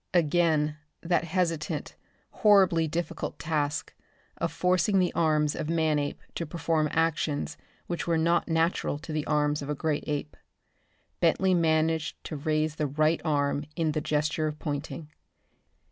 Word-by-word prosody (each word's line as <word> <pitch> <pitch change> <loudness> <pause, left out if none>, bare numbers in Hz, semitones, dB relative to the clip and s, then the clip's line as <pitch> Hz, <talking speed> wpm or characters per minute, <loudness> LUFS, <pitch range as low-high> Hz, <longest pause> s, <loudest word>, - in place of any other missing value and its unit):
Again 155 -2 +2 0.2
that 175 0 +1
hesitant, 165 -3 -2 0.5
horribly 190 -6 +5
difficult 165 +1 -3
task, 150 -3 -2 0.4
of 170 -1 -1
forcing 180 +3 +2
the 180 -2 +2
arms 155 -2 +2
of 150 - -4
Manape 155 -3 0
to 170 - -4
perform 160 -1 0
actions 155 -2 0 0.3
which 175 0 -4
were 165 -1 +2
not 170 +2 +2
natural 165 -2 +1
to 155 +1 -7
the 155 -1 -2
arms 150 0 +1
of 140 - -6
a 150 - 0
great 150 0 -1
ape. 150 0 -3 0.8
Bentley 185 +3 +3
managed 160 -1 +1
to 155 - -5
raise 155 +1 -1
the 150 - 0
right 155 +3 +1
arm 145 -2 0
in 160 -2 +1
the 155 0 -1
gesture 155 +1 0
of 150 0 -4
pointing. 150 +1 -5
155 Hz, 145 wpm, -28 LUFS, 150-170 Hz, 0.8 s, horribly